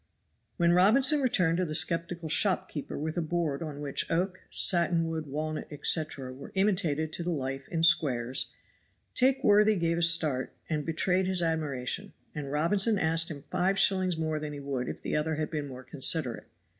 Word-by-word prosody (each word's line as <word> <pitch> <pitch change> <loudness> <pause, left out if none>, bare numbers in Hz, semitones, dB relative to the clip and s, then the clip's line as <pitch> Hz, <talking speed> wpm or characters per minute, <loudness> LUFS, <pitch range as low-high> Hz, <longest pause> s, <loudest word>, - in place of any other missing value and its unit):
When 170 -1 +3
Robinson 260 - +5
returned 180 -10 +2
to 185 - +1
the 155 -2 -4
skeptical 170 0 +1
shopkeeper 160 -3 -1
with 155 +3 -4
a - - +1
board 160 -3 -2
on 150 -3 -6
which 140 -2 -2
oak, 185 +2 -1
satin 170 -2 +3
wood, 160 -2 -4
walnut, 155 +2 -4
etc., 145 -3 -1
were 140 +2 -11
imitated 170 -6 0
to - - -4
the 175 - -3
life 135 -4 -4
in 165 -2 -2
squares, 135 -7 +2 0.7
that 260 +1 +4
worthy 210 +1 +5
gave 170 -2 0
a - - -1
start 160 -6 +2
and 150 -2 -3
betrayed 180 +3 +1
his 185 -2 0
admiration, 160 +3 -2 0.2
and 145 -3 -6
Robinson 195 +8 +2
asked 165 -1 +1
him 145 -4 -8
five 190 +2 +1
shillings 185 -3 +2
more 155 -1 -2
than 150 -1 -5
he 145 - -7
would 135 -3 -4
if - - -8
the - - -2
other 155 +1 0
had 155 +1 -3
been 150 -3 -3
more 130 -1 -9
considerate. 135 -1 -1
160 Hz, 180 wpm, -29 LUFS, 150-180 Hz, 0.7 s, Robinson